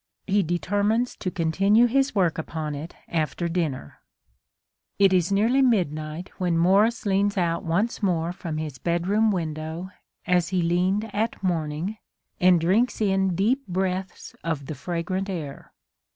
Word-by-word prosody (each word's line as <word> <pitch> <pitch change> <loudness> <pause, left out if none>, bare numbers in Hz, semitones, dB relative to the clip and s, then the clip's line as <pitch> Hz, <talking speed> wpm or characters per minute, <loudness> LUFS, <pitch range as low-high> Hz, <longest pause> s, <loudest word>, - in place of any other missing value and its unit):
He 200 +1 +2
determines 205 +7 0
to 185 - -3
continue 195 +7 +3
his 270 +1 +1
work 175 -5 +2
upon 155 -1 -4
it 150 +4 -7
after 165 +1 -1
dinner 160 - -3 1.0
It 195 -1 +5
is 180 0 +2
nearly 225 +7 +3
midnight 170 - 0
when 175 -3 +1
Morris 200 +8 +3
leans 200 +1 +1
out 170 -2 0
once 200 +10 0
more 175 -3 0
from 170 -4 -5
his 150 -5 -5
bedroom 180 - +1
window, 160 0 -3 0.3
as 180 -1 +2
he 185 -2 0
leaned 185 +5 0
at 220 0 -2
morning, 170 +3 -2 0.4
and 180 -1 +5
drinks 200 +9 +2
in 190 -3 +1
deep 230 +8 +1
breaths 185 0 -3
of 155 -4 -2
the 155 - -5
fragrant 180 +6 -3
air. 155 -7 -6
180 Hz, 140 wpm, -25 LUFS, 165-200 Hz, 1.0 s, It